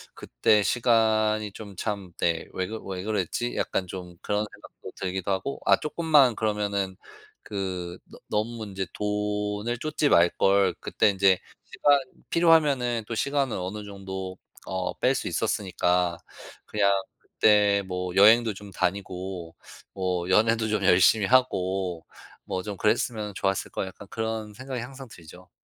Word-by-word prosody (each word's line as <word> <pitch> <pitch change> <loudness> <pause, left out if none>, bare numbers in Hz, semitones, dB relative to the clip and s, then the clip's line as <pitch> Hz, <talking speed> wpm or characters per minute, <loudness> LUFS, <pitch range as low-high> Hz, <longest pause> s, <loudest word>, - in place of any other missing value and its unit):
그때 100 - +2
시간이 110 -1 +2
좀 100 -3 -10
참 100 -3 -4
네 85 -1 0
'왜 95 0 -2
그 110 +1 -6
왜 95 -1 -5
그랬지?' 110 +3 -2
약간 95 - -1
좀 90 -1 -8
그런 105 +1 -1
생각도 - - -12
들기도 95 +1 -3
하고 115 +9 -2
아 - - +6
쪼끔만 150 -6 +3
그러면은 100 -3 -1 0.5
그 95 -3 -4
'너 - - -14
너무 110 +2 -2
인제 95 -1 -4
돈을 105 +2 -2
좇지 155 0 0
말걸.' 95 +3 +4
그때 - - +2
인제 95 -1 +4 0.3
시간 145 -1 +3 0.3
필요하면은 145 -9 +3
또 115 - -2
시간을 140 -1 0
어느 95 +4 -5
정도 95 -2 -7 0.3
어 95 -1 -3
뺄 130 +2 +3
수 - - -3
있었으니까 90 -5 0 0.5
그냥 100 -2 +2 0.3
'그때 105 -2 +3
뭐 90 -1 -3
여행도 110 +2 +6
좀 100 0 -11
다니고 90 -3 -3 0.4
뭐 90 -2 -2
연애도 110 +2 +3
좀 105 -2 0
열심히 95 +4 +5
하고 95 -8 +1 0.4
뭐 95 0 -3
좀 105 -2 -5
그랬으면 105 -1 0
좋았을 95 -1 -1
걸.' - - -3
약간 95 +2 -11
그런 110 -1 -4
생각이 130 -1 -5
항상 135 +1 -9
들죠. 90 +1 -14
105 Hz, 275 characters per minute, -26 LUFS, 95-110 Hz, 0.5 s, 아